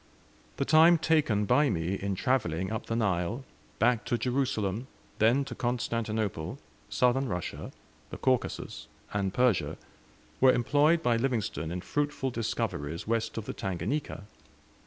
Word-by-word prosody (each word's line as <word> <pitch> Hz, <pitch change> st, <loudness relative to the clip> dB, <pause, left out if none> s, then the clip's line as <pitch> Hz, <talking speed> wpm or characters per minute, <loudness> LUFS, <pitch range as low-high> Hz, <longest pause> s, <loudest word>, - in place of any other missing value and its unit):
The 140 Hz, -, 0 dB
time 160 Hz, +3 st, +7 dB
taken 150 Hz, -10 st, +2 dB
by 145 Hz, +7 st, +4 dB
me 85 Hz, -2 st, -1 dB
in 100 Hz, 0 st, -2 dB
travelling 95 Hz, -6 st, 0 dB
up 110 Hz, -, -4 dB
the 115 Hz, -, -1 dB
Nile, 105 Hz, +2 st, 0 dB, 0.3 s
back 120 Hz, -1 st, +2 dB
to 120 Hz, -, 0 dB
Jerusalem, 125 Hz, -4 st, -1 dB, 0.3 s
then 120 Hz, +6 st, +4 dB
to -, -, -6 dB
Constantinople, 110 Hz, -7 st, -2 dB, 0.3 s
Southern 130 Hz, +2 st, +2 dB
Russia, 90 Hz, -2 st, -4 dB, 0.4 s
the -, -, -7 dB
Caucasus, 130 Hz, -2 st, -1 dB, 0.3 s
and 100 Hz, -2 st, 0 dB
Persia, 105 Hz, -12 st, +1 dB, 0.6 s
was 130 Hz, 0 st, +6 dB
employed 150 Hz, +7 st, +3 dB
by 120 Hz, -4 st, +3 dB
Livingstone 110 Hz, -9 st, -1 dB
in 90 Hz, +2 st, -4 dB
fruitful 145 Hz, +2 st, -1 dB
discoveries 85 Hz, -, -3 dB
west 115 Hz, 0 st, -1 dB
of 110 Hz, -, -3 dB
the -, -, -4 dB
Tanganika. 100 Hz, -, -3 dB
115 Hz, 135 wpm, -29 LUFS, 100-130 Hz, 0.6 s, time